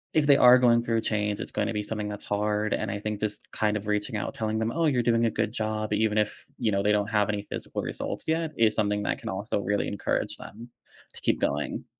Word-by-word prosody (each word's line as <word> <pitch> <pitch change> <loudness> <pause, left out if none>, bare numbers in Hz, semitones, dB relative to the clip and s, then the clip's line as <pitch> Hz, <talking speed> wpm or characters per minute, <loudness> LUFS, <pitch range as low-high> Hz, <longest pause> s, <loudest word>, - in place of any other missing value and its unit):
if 155 -2 +4
they 140 - +8
are 125 0 +8
going 120 -2 +5
through 115 -1 0
a - - +1
change, 105 -1 -1
it's - - -5
gonna 115 - -1
be 105 -1 -2
something 105 0 -3
that's 105 0 -7
hard, 105 +1 0
and 110 - -1
I 100 - -3
think 105 0 -3
just 105 -1 -4
kind 105 -1 0
of 105 - -7
reaching 105 +2 -1
out, 105 - -3
telling 110 -1 -1
them, 110 +1 0
"Oh, 165 -1 +2
you're 125 -4 +2
doing 115 0 +3
a - - -1
good 110 0 -1
job" 110 -2 -2
even 110 0 +1
if, 105 -1 -1
you 115 -4 +1
know, 100 -1 +1
they 105 - +3
don't 105 0 +1
have 105 -1 +2
any 105 -1 -1
physical - - -4
results - - -4
yet 160 0 0
is 115 -1 +4
something 105 -1 0
that - - -1
can - - -6
also 100 +3 -2
really 100 +1 0
encourage 100 - -2
them 115 +3 -11 0.4
to - - -13
keep - - +1
going. 75 +1 -1
105 Hz, 255 wpm, -27 LUFS, 105-115 Hz, 0.4 s, they